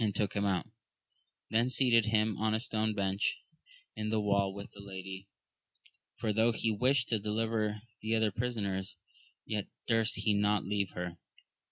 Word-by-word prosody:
took 105 -1 0
him 100 0 0
out, 95 -4 +1 0.9
then 115 +3 +3
seated 120 -4 +5
himsdf 110 -1 +2
on 110 0 +2
a - - +1
stone 110 -2 0
bench 100 0 0 0.6
in 110 0 -2
the 110 0 +1
wall 100 -1 +2
with 100 +1 -8
the 100 - -14
lady, 95 -1 -7 0.9
for 110 - -1
tho* 110 +2 +4
he 115 0 0
wished 125 +4 +2
to 110 - +2
deliver 110 0 -1 0.2
the 110 +1 0
other 110 -1 +2
prisoners, 100 -4 -2 0.5
yet 105 -2 -2 0.2
durst 115 -1 +2
he 105 - +1
not 105 -1 +2
leave 100 -1 0
her. 90 -1 -4
105 Hz, 160 wpm, -32 LUFS, 100-110 Hz, 0.9 s, seated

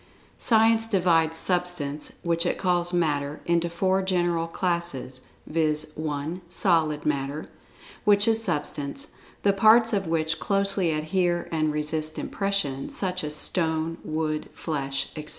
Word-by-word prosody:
Science 225 0 +4
divides 170 -6 +2
Substance 175 -5 +1
(which 170 -1 +1
it 175 - -1
calls 175 -2 0
"Matter") 150 -4 -1
into 170 0 +1
four 190 +3 +1
general 175 -3 0
classes, 165 -8 -2 0.2
viz.: 155 -1 +1
(1) 155 +3 -4
Solid 160 -5 +1
Matter, 140 +1 -2 0.6
which 205 +1 +4
is 225 0 +2
Substance, 150 - -3 0.3
the 200 - +4
parts 220 +3 +5
of 195 -4 0
which 160 0 -1
closely 195 -3 +1
adhere 175 +3 -1
and 155 -2 0
resist 155 +1 +1
impression,[Pg 195 -10 -2
62] - - -8
such 185 -2 -1
as 150 0 -3
stone, 160 0 0
wood, 155 -1 -3
flesh, 140 -4 -3
etc. 155 -1 -7
165 Hz, 135 wpm, -25 LUFS, 155-185 Hz, 0.6 s, parts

